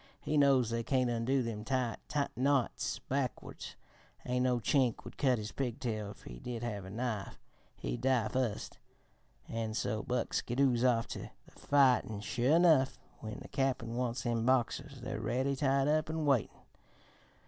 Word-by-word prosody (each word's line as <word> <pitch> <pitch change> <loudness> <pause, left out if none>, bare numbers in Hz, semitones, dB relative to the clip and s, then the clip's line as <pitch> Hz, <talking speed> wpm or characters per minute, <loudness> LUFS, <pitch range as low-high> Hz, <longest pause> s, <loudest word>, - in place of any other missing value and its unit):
He 155 - -2
knows 135 -5 +4
they 115 0 0
can't 125 0 +1
undo 125 +3 +1
them 110 -2 -4
tight 125 -1 -1 0.4
knots 135 -1 +1
backwards, 135 -2 -4 0.5
an' 125 0 0
no 125 -1 +2
Chink 125 -1 +1
would - - -10
cut 130 -3 +2
his 105 0 -5
pigtail 115 -5 -3
if 100 - -12
he - - -9
did 120 - -5
have 105 -5 -4
a - - -8
knife 110 -1 -3 0.4
he'd 120 - -4
die 125 -4 +2
foist 125 -3 -2 0.7
an' 115 -1 -3
so 110 -1 -1
Buck 125 0 -2
skidoos 125 -1 +2
off 120 -3 +3
to - - -6 0.2
the - - -19
fight, 135 -3 +3
an', 105 -2 -6
sure 125 +8 +2
enough, 160 -6 +5 0.2
when 110 -1 -7
the - - -9
Cap'n 135 -4 -1
wants 125 0 -1
them 115 -2 0
Boxers, 130 +2 0
they're 130 +2 -4
ready, 130 +3 0
tied 135 0 +2
up 155 +1 +2
an' 160 -1 -1
waitin'. 135 -5 +2
125 Hz, 165 wpm, -33 LUFS, 115-135 Hz, 0.7 s, enough